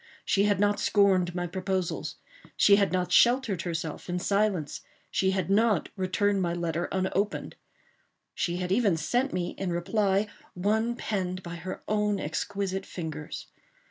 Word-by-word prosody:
She 200 +1 +3
had 205 -2 +2
not 205 0 +2
scorned 190 -5 +3
my 175 0 -1
proposals. 185 0 -2 0.4
She 200 -1 +6
had 200 -1 +2
not 180 -1 0
sheltered 235 -3 +4
herself 165 -1 -4
in 175 - -1
silence. 200 -5 0 0.3
She 190 - +2
had 190 -1 0
not 215 -3 +3
returned 195 +1 +1
my 170 -1 0
letter 170 0 -1
unopened. 190 +2 -1 0.8
She 175 - -1
had 180 0 -3
even 200 -5 +3
sent 245 - 0
me, 180 -1 -1
in 190 - -1
reply, 195 +3 +1 0.3
one 220 +6 +1
penned 185 -5 -3
by 170 0 -6
her 185 +3 -6
own 210 -1 +1
exquisite 195 +4 -3
fingers. 155 -3 -6
190 Hz, 145 wpm, -28 LUFS, 175-205 Hz, 0.8 s, She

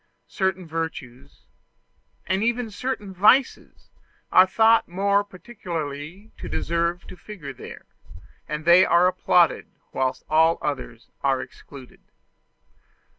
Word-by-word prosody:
Certain 190 -1 -1
virtues, 145 -5 -7 0.8
and 190 +3 -1
even 235 -1 -1
certain 210 -3 -5
vices, 215 +9 +1 0.4
are 185 +1 +6
thought 225 +4 +3
more 200 +3 +1
particularly 175 -3 -8
to - - -7
deserve 170 +1 -2
to - - -11
figure 175 -6 -10
there; - - -11 0.6
and 150 +1 -5
they 175 +2 +7
are 170 0 +4
applauded 180 -2 +2 0.3
whilst 130 -1 -2
all 160 +1 +3
others 125 -5 -6
are 135 -1 +1
excluded. 135 -3 -13
175 Hz, 110 wpm, -23 LUFS, 150-200 Hz, 0.8 s, they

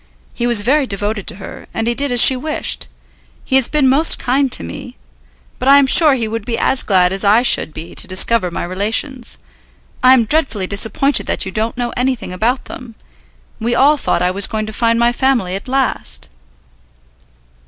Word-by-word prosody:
He 240 - -2
was 235 -4 +3
very 270 +5 +1
devoted 205 0 -4
to - - -4
her, 190 0 -11
and 225 - -2
he 235 - 0
did 280 +2 -1
as 245 - +4
she 260 - +8
wished. 300 +4 -2 0.6
He 265 - -1
has 265 -2 +3
been 300 -3 +1
most 285 +5 +3
kind 265 +1 -1
to - - -1
me; 85 -6 -9 0.6
but 255 - -4
I 280 +1 +7
am 280 - +4
sure 295 +1 +5
he 230 -4 -3
would 225 0 -5
be 230 +1 -4
as 265 - +1
glad 185 -2 +1
as 195 - 0
I 210 +4 +3
should 240 - +3
be 160 +2 -10
to - - -2
discover 190 +1 0
my 170 - -5
relations. 220 +8 -3 0.6
I 255 +1 +6
am 235 -3 +1
dreadfully 265 -8 -1
disappointed 220 +8 0
that - - -1
you 190 - -6
don't 220 +4 -3
know 240 -1 -3
anything 250 -7 -3
about 235 +8 -2
them. 240 -3 -11 0.6
We 235 +1 -1
all 280 +5 +4
thought 280 - -1
I 180 - +1
was 195 +1 +2
going 215 -1 -4
to 215 - -8
find 230 +1 0
my 235 0 +2
family 245 -8 0
at 195 +5 -6
last." 250 - -3
235 Hz, 200 wpm, -15 LUFS, 200-265 Hz, 0.6 s, she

